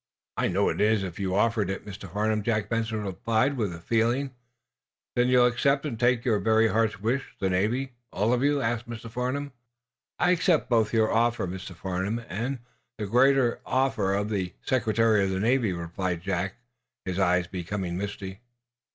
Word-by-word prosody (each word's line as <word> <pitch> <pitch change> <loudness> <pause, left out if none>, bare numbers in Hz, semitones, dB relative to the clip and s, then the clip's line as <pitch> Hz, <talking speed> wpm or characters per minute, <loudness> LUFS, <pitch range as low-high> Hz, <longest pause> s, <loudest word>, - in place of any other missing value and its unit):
"I - - +1
know 100 +3 +2
it - - -2
is, 105 -1 +3
if 90 -1 -6
you 95 -1 -1
offer 115 +2 +2
it, 95 0 -3
Mr. 95 -3 -9
Farnum," 105 +2 0
Jack 105 -1 -1
Benson 110 -2 -1
replied, 110 - 0
with 90 -9 -3
feeling. 120 +5 +1 0.8
"Then 120 0 +3
you'll 125 -1 +5
accept, 140 +4 +2
and 115 -7 -4
take 120 -1 +2
your 110 -4 +2
very 110 +1 +3
heart's 110 -2 +1
wish 120 +6 -2
the 95 -1 0
Navy 120 +8 0 0.2
all 110 +5 +1
of 125 - +1
you?" 145 0 +2
asked 120 +1 -2
Mr. 115 -1 -7
Farnum. 130 +4 -2 0.7
"I 180 - +3
accept 170 -6 +2
both 115 -2 +3
your 110 -1 +2
offer, 120 -1 +2
Mr. 90 0 -7
Farnum, 95 +5 -2
and, 125 +8 -2 0.4
the 105 - -3
greater 125 +3 +3
offer 110 -7 +1
of 105 +2 -1
the 95 -4 -2
Secretary 115 -4 +2
of 95 - 0
the 95 0 -1
Navy," 115 0 +2
replied 85 0 -3
Jack, 95 0 -2 0.5
his 95 0 -2
eyes 90 -1 +3
becoming 90 0 -4
misty. 95 0 -5
110 Hz, 175 wpm, -27 LUFS, 95-120 Hz, 0.8 s, you'll